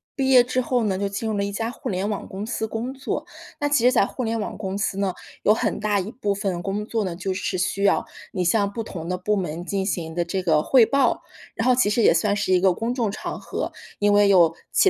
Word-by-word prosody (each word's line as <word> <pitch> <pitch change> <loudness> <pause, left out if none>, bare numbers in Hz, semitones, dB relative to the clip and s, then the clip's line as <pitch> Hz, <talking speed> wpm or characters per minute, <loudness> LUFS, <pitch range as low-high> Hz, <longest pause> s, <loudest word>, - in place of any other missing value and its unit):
毕 270 -2 0
业 255 -2 +7
之 255 +1 0
后 245 -1 0
呢 195 -3 0
就 200 - -1
进 200 +3 -3
入 220 - -1
了 200 - 0
一 200 - -2
家 225 +3 -2
互 - - -6
联 190 +1 -1
网 210 -2 -3
公 195 +2 -6
司 220 -1 -2
工 230 +4 -4
作。 270 +1 -4 0.3
那 290 - +1
其 285 -5 +2
实 250 - +6
在 200 - +4
互 255 - -5
联 225 0 -1
网 210 - -4
公 195 -1 -4
司 195 -1 -1
呢， 195 -2 0 0.3
有 210 - +5
很 - - -1
大 210 -1 +1
一 195 +4 -4
部 210 -5 -2
分 195 -4 -2
工 200 +2 -3
作 225 0 -1
呢 180 -3 -3
就 190 +2 -3
是 185 0 -2
需 185 +2 -1
要 200 - +3 0.3
你 185 - -1
向 200 +2 +2
不 225 +2 -4
同 170 -5 -7
的 180 - -1
部 210 +4 0
门 175 -3 -3
进 195 0 -1
行 165 -5 -3
的 175 +1 0
这 185 +2 -3
个 155 -4 +3
汇 245 +6 +5
报。 275 0 +1 0.3
然 225 - -1
后 255 - +6
其 245 -4 +3
实 220 +2 +2
也 - - +6
算 205 -2 +1
是 205 -2 -1
一 180 - +5
个 190 -1 +4
公 230 +6 -2
众 230 -5 0
场 - - -5
合， - - -4 0.3
因 205 0 +3
为 205 0 +5
有 170 -4 +5 0.2
其 390 - +5
205 Hz, 290 characters per minute, -23 LUFS, 190-230 Hz, 0.3 s, 业